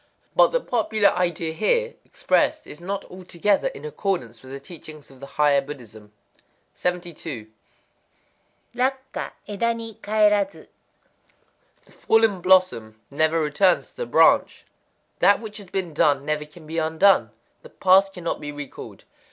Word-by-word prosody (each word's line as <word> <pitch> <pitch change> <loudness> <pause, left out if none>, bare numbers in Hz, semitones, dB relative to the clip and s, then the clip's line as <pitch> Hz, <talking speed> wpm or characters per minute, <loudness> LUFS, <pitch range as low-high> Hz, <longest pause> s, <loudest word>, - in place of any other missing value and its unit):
But - - +6
the - - 0
popular 220 - +2
idea 170 -2 -1
here 475 - +1
expressed 310 0 0
is 150 - -11
not 195 +2 -4
altogether 185 +2 -1
in 140 - -7
accord 190 +5 -1
with 115 -1 -14
the 135 +1 -9
teachings 155 -1 -12
of 135 - -17
the 140 - -9
higher 145 -2 +4
Buddhism. 115 -7 -11 0.6
72.—Rakkwa 175 - -6
éda 230 +3 -1
ni 225 -1 -8
kaerazu. 210 -1 +1 1.2
The - - -24
fallen 225 -4 +2
blossom 170 -13 +2
never 160 +3 +2
returns 160 +4 +1
to - - -31
the 485 - -4
branch. - - +3 0.5
That 200 - +5
which 215 -1 -9
has 205 -3 -11
been 180 -3 -3
done 145 -3 +2
never 150 0 -2
can 155 +2 -16
be 160 +2 -3
undone: 160 +5 +3 0.3
the 485 - -14
past 195 - +4
cannot 175 -3 -4
be 145 - -5
recalled. 145 -2 -9
175 Hz, 135 wpm, -23 LUFS, 150-205 Hz, 1.2 s, But